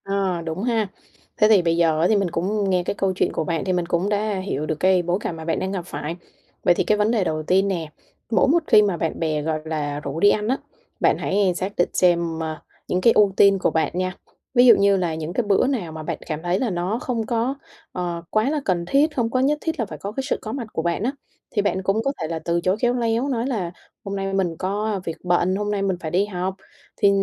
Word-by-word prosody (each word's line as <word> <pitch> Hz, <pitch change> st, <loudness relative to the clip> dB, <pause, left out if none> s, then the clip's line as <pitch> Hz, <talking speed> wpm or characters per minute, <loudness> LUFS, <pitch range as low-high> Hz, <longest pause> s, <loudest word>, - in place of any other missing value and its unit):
À, 195 Hz, -3 st, -1 dB
đúng 165 Hz, +5 st, -3 dB
ha. 230 Hz, -3 st, +1 dB, 0.5 s
Thế 215 Hz, -, +5 dB
thì 210 Hz, -4 st, +6 dB
bây 165 Hz, -1 st, +1 dB
giờ 160 Hz, -2 st, +3 dB
á, 170 Hz, -, +4 dB
thì 220 Hz, -, +3 dB
mình 195 Hz, -3 st, +1 dB
cũng 195 Hz, +4 st, -1 dB
nghe 180 Hz, -1 st, +2 dB
cái -, -, -2 dB
câu 195 Hz, -1 st, 0 dB
chuyện -, -, +1 dB
của -, -, -1 dB
bạn 165 Hz, +1 st, -2 dB
thì 185 Hz, -, 0 dB
mình 175 Hz, -1 st, 0 dB
cũng 175 Hz, +3 st, 0 dB
đã 210 Hz, +1 st, 0 dB
hiểu 185 Hz, -5 st, -3 dB
được 155 Hz, -, -1 dB
cái 185 Hz, -1 st, +4 dB
bối 175 Hz, +1 st, 0 dB
cảnh 170 Hz, -, -3 dB
mà 160 Hz, 0 st, -8 dB
bạn 165 Hz, -, 0 dB
đang 190 Hz, -, -2 dB
gặp 185 Hz, -3 st, -4 dB
phải. 165 Hz, -2 st, -5 dB, 0.5 s
Vậy 175 Hz, -, +5 dB
thì -, -, +1 dB
cái 210 Hz, -, +2 dB
vấn 210 Hz, +2 st, +2 dB
đề 225 Hz, -5 st, +2 dB
đầu 155 Hz, -3 st, -2 dB
tiên 190 Hz, +5 st, +2 dB
nè, 170 Hz, -5 st, -2 dB, 0.4 s
mỗi 205 Hz, -5 st, +4 dB
một 330 Hz, +4 st, +3 dB
khi 210 Hz, -, +7 dB
mà 200 Hz, -4 st, +1 dB
bạn 165 Hz, -1 st, -2 dB
bè, 155 Hz, -2 st, 0 dB
gọi 155 Hz, +1 st, -1 dB
là, 145 Hz, -2 st, -2 dB
rủ 145 Hz, +1 st, -5 dB
đi 205 Hz, -, +6 dB
ăn 210 Hz, 0 st, +1 dB
á, 260 Hz, +3 st, +1 dB, 0.4 s
bạn -, -, +3 dB
hãy 195 Hz, -2 st, +1 dB
xác 190 Hz, +3 st, -2 dB
định 175 Hz, -, +2 dB
xem, 170 Hz, -2 st, +2 dB
ơ, 160 Hz, -1 st, -3 dB, 0.3 s
những 180 Hz, -, 0 dB
cái 230 Hz, -, +5 dB
ưu 205 Hz, -2 st, +4 dB
tiên 195 Hz, -1 st, +6 dB
của -, -, +1 dB
bạn 160 Hz, -, +1 dB
nha. 185 Hz, 0 st, -1 dB, 0.4 s
Ví 245 Hz, -1 st, +6 dB
dụ 245 Hz, -, +9 dB
như 200 Hz, 0 st, +4 dB
là 175 Hz, -3 st, -1 dB
những 160 Hz, +1 st, -5 dB
cái 245 Hz, -, +1 dB
bữa 200 Hz, +4 st, +3 dB
nào 220 Hz, -, -2 dB
mà 155 Hz, 0 st, -7 dB
bạn -, -, -3 dB
cảm 155 Hz, -1 st, -4 dB
thấy 175 Hz, +2 st, 0 dB
là 250 Hz, -, 0 dB
nó 185 Hz, +5 st, -1 dB
không 235 Hz, -3 st, -2 dB
có, 235 Hz, +4 st, 0 dB, 0.4 s
ờ, 175 Hz, -2 st, -3 dB
quá 215 Hz, +5 st, +2 dB
là 300 Hz, 0 st, -1 dB
cần 175 Hz, -3 st, 0 dB
thiết, 290 Hz, -, +2 dB
không 235 Hz, -3 st, +1 dB
có 255 Hz, -, +1 dB
nhất 285 Hz, +3 st, +2 dB
thiết 320 Hz, -2 st, -3 dB
là 230 Hz, -, +1 dB
phải -, -, -8 dB
có 200 Hz, -, -5 dB
cái 270 Hz, +5 st, -3 dB
sự -, -, 0 dB
có 220 Hz, -, -5 dB
mặt 240 Hz, -2 st, -4 dB
của -, -, -1 dB
bạn 170 Hz, +4 st, -1 dB
á, 250 Hz, -, +1 dB, 0.4 s
thì 205 Hz, -, +1 dB
bạn 190 Hz, -2 st, -1 dB
cũng 195 Hz, +4 st, +1 dB
có 275 Hz, -, +1 dB
thể 160 Hz, -, -1 dB
là 165 Hz, 0 st, -3 dB
từ 170 Hz, 0 st, +1 dB
chối 185 Hz, +3 st, +1 dB
khéo 245 Hz, 0 st, +3 dB
léo 235 Hz, +1 st, 0 dB
nói 245 Hz, -1 st, -1 dB
là 200 Hz, -10 st, -2 dB, 0.3 s
"Hôm 200 Hz, -2 st, -4 dB
nay 195 Hz, 0 st, -3 dB
mình 185 Hz, -4 st, 0 dB
có 205 Hz, +1 st, -2 dB
việc 165 Hz, -, -4 dB
bận, 180 Hz, +1 st, +2 dB
hôm 210 Hz, +1 st, -2 dB
nay 205 Hz, -1 st, -1 dB
mình 190 Hz, -2 st, 0 dB
phải 160 Hz, -3 st, -5 dB
đi 185 Hz, +4 st, +2 dB
học." 185 Hz, -1 st, -3 dB, 0.4 s
Thì 200 Hz, -, +5 dB
190 Hz, 275 wpm, -23 LUFS, 170-215 Hz, 0.5 s, dụ